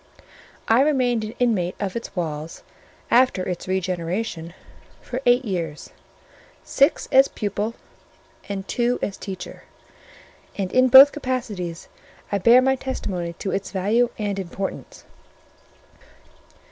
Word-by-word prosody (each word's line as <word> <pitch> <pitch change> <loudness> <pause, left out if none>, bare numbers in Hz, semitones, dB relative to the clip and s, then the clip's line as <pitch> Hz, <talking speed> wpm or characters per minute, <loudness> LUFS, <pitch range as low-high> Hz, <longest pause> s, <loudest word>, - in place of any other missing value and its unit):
I 225 +3 +5
remained 255 -6 +1
an 215 +1 -6
inmate 200 -8 0
of 195 -2 -3
its 230 - -6
walls, 160 -2 -5 0.5
after 240 -7 +3
its 180 -1 -4
regeneration, 180 -1 -3 0.4
for 255 +1 -6
eight 245 +2 +4
years: 170 -7 -4 0.7
six 280 +4 +2
as 270 +1 +6
pupil, 210 +2 -3 0.7
and 195 -1 -5
two 245 0 0
as 200 - -2
teacher; 190 -2 -8 0.9
and 190 -2 -2
in 255 0 +4
both 265 +3 +9
capacities 230 - -4 0.4
I 200 - 0
bear 235 +6 +6
my 265 0 +3
testimony 190 -10 -4
to 190 +3 -5
its 195 - -3
value 215 +5 +1
and 205 -2 -2
importance. 190 +1 -6
205 Hz, 120 wpm, -23 LUFS, 185-245 Hz, 0.9 s, both